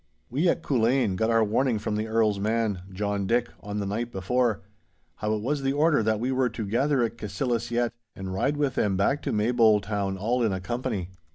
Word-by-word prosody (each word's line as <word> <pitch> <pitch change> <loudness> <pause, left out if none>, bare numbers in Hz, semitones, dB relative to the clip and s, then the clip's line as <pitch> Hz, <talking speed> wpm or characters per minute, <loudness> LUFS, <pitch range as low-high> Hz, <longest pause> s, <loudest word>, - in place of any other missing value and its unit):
We 155 +8 +2
at - - 0
Culzean 120 -4 +2
got 110 +4 +1
our 115 -1 +4
warning 115 +3 +1
from 105 0 -2
the 110 +1 -2
Earl's 110 -2 +2
man, 110 -2 0
John 100 0 -2
Dick, 120 +2 +1
on 105 0 -5
the 100 - -1
night 115 +4 -3
before, 115 +3 0 0.6
how 105 0 -1
it 105 - -4
was 145 +3 -1
the 135 0 0
order 150 -1 +3
that 110 0 +1
we 125 +3 -1
were 130 -1 +2
to 110 -1 -5
gather 130 +5 +1
at 115 - -3
Cassillis 115 +3 -2
yett 120 0 0 0.2
and 95 -1 -5
ride 140 +10 0
with 145 -3 +1
them 100 -6 +1
back 135 +10 +1
to - - -2
Maybole 110 0 +4
town 100 -2 -2
all 120 +6 0
in 110 -4 +2
a 95 - -2
company. 110 -3 -3
115 Hz, 215 wpm, -26 LUFS, 105-125 Hz, 0.6 s, our